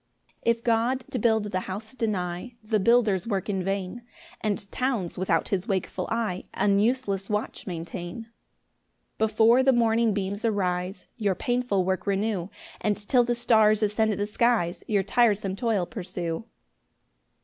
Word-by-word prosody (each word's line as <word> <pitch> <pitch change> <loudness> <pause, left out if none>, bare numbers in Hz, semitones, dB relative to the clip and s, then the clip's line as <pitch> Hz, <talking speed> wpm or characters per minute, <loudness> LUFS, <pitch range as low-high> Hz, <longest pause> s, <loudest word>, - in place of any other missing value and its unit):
1 235 - +3
If 230 0 -3
God 240 +3 +1
to 255 - -1
build 220 -1 +3
the 185 - 0
house 205 +5 -6
deny, 210 -1 -3
The 215 0 +1
builders 220 -3 +3
work 200 -2 -2
in 190 -2 -1
vain; 195 +4 -3 0.4
And 205 -2 -2
towns, 245 -9 -1
without 175 -3 0
his 190 -2 -1
wakeful 190 -2 -2
eye, 220 -6 -2
An 200 0 +3
useless 205 -4 0
watch 210 0 -3
maintain. 175 +3 -5
2 225 - -22 0.9
Before 220 +3 +4
the 265 0 +5
morning 230 -2 +3
beams 200 +1 -3
arise, 185 -3 -1
Your 205 -5 +1
painful 245 -4 0
work 190 +2 -1
renew, 200 -2 0 0.3
And 210 -1 +1
till 250 -2 +5
the 240 0 0
stars 220 -2 +4
ascend 215 +1 +2
the 205 0 -1
skies 210 -5 +1
Your 205 -3 +2
tiresome 205 -3 +2
toil 220 -5 0
pursue. 180 -1 -5
210 Hz, 150 wpm, -26 LUFS, 190-230 Hz, 0.9 s, the